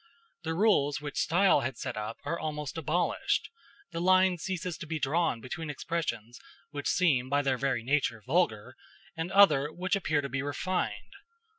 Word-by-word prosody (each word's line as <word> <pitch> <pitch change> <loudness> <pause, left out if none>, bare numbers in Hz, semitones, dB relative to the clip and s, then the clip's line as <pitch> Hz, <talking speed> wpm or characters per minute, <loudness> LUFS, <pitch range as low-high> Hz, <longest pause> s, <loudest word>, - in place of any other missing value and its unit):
The 160 -1 -3
rules 165 -8 +3
which 145 -1 -5
style 185 0 +4
had 130 -1 -3
set 120 - -4
up 105 +1 -5
are 170 - -2
almost 150 -2 -4
abolished: 165 +2 0 0.4
the 165 - -4
line 185 0 +4
ceases 180 0 -3
to 165 - -7
be 160 0 -2
drawn 150 -3 0
between 160 +5 -6
expressions 135 -6 -4 0.3
which 145 -1 -4
seem 135 -8 +2
by 145 +1 +2
their 130 -2 0
very 135 -4 0
nature 125 -4 0
vulgar, 125 -6 0 0.4
and 165 +2 -4
other 150 -8 +5
which 185 +4 -1
appear 155 -6 0
to 140 - -4
be 135 0 -2
refined. 145 +6 -3
150 Hz, 165 wpm, -29 LUFS, 135-175 Hz, 0.4 s, other